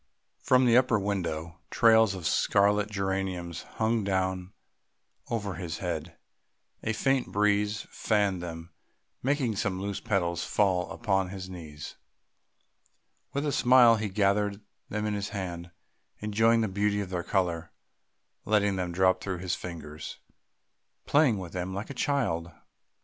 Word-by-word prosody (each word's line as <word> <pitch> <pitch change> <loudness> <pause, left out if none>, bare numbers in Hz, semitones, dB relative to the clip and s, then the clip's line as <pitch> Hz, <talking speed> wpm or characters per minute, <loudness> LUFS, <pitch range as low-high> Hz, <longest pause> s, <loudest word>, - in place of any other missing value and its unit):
From 130 0 +4
the 120 -1 +5
upper 125 -3 +4
window 85 -4 -3
trails 110 -3 +5
of 90 -3 -7
scarlet 105 +1 +3
geraniums 95 -4 -2 0.2
hung 110 0 +1
down 95 -1 -1 0.8
over 105 -4 -2
his 85 -2 -5
head; 85 -2 -4 0.6
a 110 - -1
faint 135 +3 0
breeze 105 +1 +1
fanned 100 -4 +1
them, 85 0 -7 0.5
making 130 -4 0
some 95 -2 -1
loose 100 0 -3
petals 85 -4 0
fall 95 -4 +1
upon 95 -5 0
his 95 -1 -7
knees. 75 -4 -9 1.4
With 140 +2 -1
a 145 - +1
smile 125 -3 +6
he 110 -1 -2
gathered 100 +1 +1 0.3
them 105 0 -2
in 105 - -1
his 100 0 -3
hand, 90 -4 -5 0.5
enjoying 110 +2 +2
the 110 - +1
beauty 105 +1 0
of 95 -2 -6
their 90 -1 -1
colour, 85 -4 -1 0.7
letting 100 -2 +2
them 90 -1 -2
drop 95 +1 +3
through 95 -2 -3
his 90 0 -3
fingers, 80 -3 -7 0.9
playing 140 -7 +4
with 90 -3 -7
them 90 +1 -3
like 105 +7 -5
a - - -5
child. 115 - -1
100 Hz, 140 wpm, -28 LUFS, 90-110 Hz, 1.4 s, smile